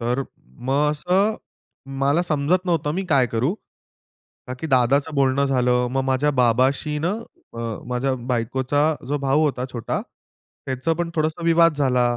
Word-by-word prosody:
तर 120 +3 0 0.5
मग 145 +2 +2
असं 185 +8 +1 0.6
मला 140 +5 +2
समजत 175 +3 0
नव्हतं, 160 -4 0
मी 190 +2 -2
काय 135 -6 +3
करू? 120 - -1 0.9
का 125 - -5
की 160 - -3
दादाचं 140 +3 +2
बोलणं 140 0 +2
झालं, 125 -2 +2
मग 135 - +1
माझ्या 135 +2 +1
बाबाशी 130 +4 +1
न, - - +2 0.5
अ, - - -8 0.3
माझ्या 125 +2 0
बायकोचा 125 +4 0 0.3
जो 145 +1 0
भाऊ 140 +2 +1
होता 130 -4 -1
छोटा, 115 -3 -3 0.7
त्याचं 130 +5 -1
पण 170 0 -2
थोडसं 155 +1 -1
विवाद 165 -1 +4
झाला. 125 -3 +2
140 Hz, 150 wpm, -22 LUFS, 125-155 Hz, 0.9 s, विवाद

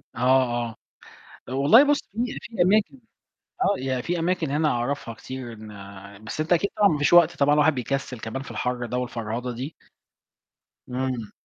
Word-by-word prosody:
آه، 130 +2 +4 0.2
آه. 115 - -9 0.8
والله 140 - +6
بُص 290 0 +2
في 235 +4 -3
في 225 -4 -4
أماكن 210 +8 +2 0.6
آه، 205 - +3
يعني 130 -1 -2
في 175 +5 -2
أماكن 165 -2 0
هنا 150 +2 +2
أعرفها 120 -2 -2
كتير 130 +1 -8
إن 100 -2 -11
بس 110 +7 -5
أنت 155 +3 0
أكيد 175 +4 +2
طبعًا 205 - +5
ما 155 - 0
فيش 145 - +1
وقت 175 -2 +6
طبعًا، 145 +1 +3
الواحد 150 +1 +4
بيكسِّل 125 0 -3
كمان 110 +5 -5
في - - -11
الحَر 125 -1 -2
ده 125 +2 -3
والفرهضة 120 0 -4
دي. 130 +7 -6 1.2
إمم. 125 -3 -3
130 Hz, 170 wpm, -25 LUFS, 120-165 Hz, 1.2 s, والله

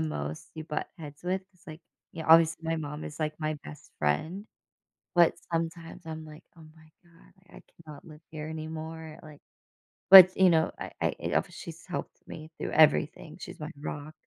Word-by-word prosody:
most 75 - -4
you 160 - -6
butt 150 -1 -4
heads 150 -2 -11
with, 185 +1 -1
it's, 185 +1 -27
like 155 0 -10 0.3
yeah, 160 -2 -7
obviously, 165 0 +6
my 165 0 -1
mom 150 -1 -6
is, 150 - -8
like, 155 0 -1
my 155 -1 -2
best 75 - -12
friend, 155 - -1 0.7
but 170 -1 +5 0.2
sometimes 165 0 -3
I'm 160 0 -7
like, 155 0 -13
"Oh 160 - -14
my 160 -1 -20
god, 170 -1 -23 0.2
I - - -14 0.2
cannot 150 -2 -11
live 155 -2 -13
here 155 -1 -7
anymore." 160 0 -7
Like, 150 -2 -13 0.7
but, 185 -1 +11
you 190 -1 +6
know, 160 -1 +3
I - - -6
I - - 0
eh, - - -2
obvious - - -1
she's - - -10
helped - - -6
me 155 +1 -10
through - - -4
everything, 155 +1 +3
she's 180 +1 -9
my 150 +2 -5
rock, 150 0 -6
160 Hz, 185 wpm, -28 LUFS, 155-165 Hz, 0.7 s, but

